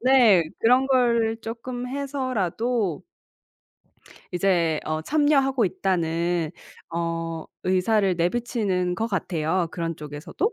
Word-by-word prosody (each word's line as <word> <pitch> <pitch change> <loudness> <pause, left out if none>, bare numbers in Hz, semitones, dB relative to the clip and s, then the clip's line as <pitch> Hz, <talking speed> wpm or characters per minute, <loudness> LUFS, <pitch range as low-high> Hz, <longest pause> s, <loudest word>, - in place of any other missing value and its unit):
네. 235 -8 +6 0.2
그런 250 +3 +4
걸 235 -4 +2
쪼끔 245 +2 -5
해서라도 245 - -1 1.3
이제 175 -4 +2
어 155 0 -2
참여하고 275 - +2
있다는 170 -3 0 0.4
어 165 -1 -3 0.2
의사를 190 +1 +2
내비치는 185 -1 0
것 225 +5 -1
같아요, 175 -3 -1
그런 165 -1 -3
쪽에서도. 150 - -3
195 Hz, 215 characters per minute, -24 LUFS, 170-245 Hz, 1.3 s, 네